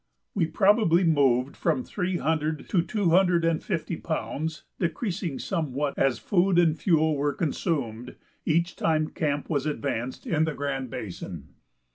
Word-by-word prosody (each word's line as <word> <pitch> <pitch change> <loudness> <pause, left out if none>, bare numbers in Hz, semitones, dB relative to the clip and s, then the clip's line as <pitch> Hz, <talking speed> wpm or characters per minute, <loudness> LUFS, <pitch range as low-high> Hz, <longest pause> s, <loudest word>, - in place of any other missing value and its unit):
We 175 -5 +1
probably 190 0 +4
moved 140 -5 +3
from 255 - 0
three 185 -5 -2
hundred 155 -1 -1
to 180 - +3
two 175 +1 0
hundred 175 -1 +4
and 165 -1 +1
fifty 170 -3 -2
pounds, 160 -1 -3 0.2
decreasing 170 - -2
somewhat 145 -5 -2
as 135 -4 +2
food 185 - +2
and 165 -3 +4
fuel 160 -1 +2
were 145 0 0
consumed, 130 - -2 0.3
each 170 +2 +1
time 155 -1 +1
camp 145 -2 -2
was 145 -2 -1
advanced 125 -2 -3
in 160 -1 +2
the 160 - -3
Grand 135 -2 -3
Basin. 100 -6 -7
160 Hz, 145 wpm, -26 LUFS, 140-175 Hz, 0.3 s, probably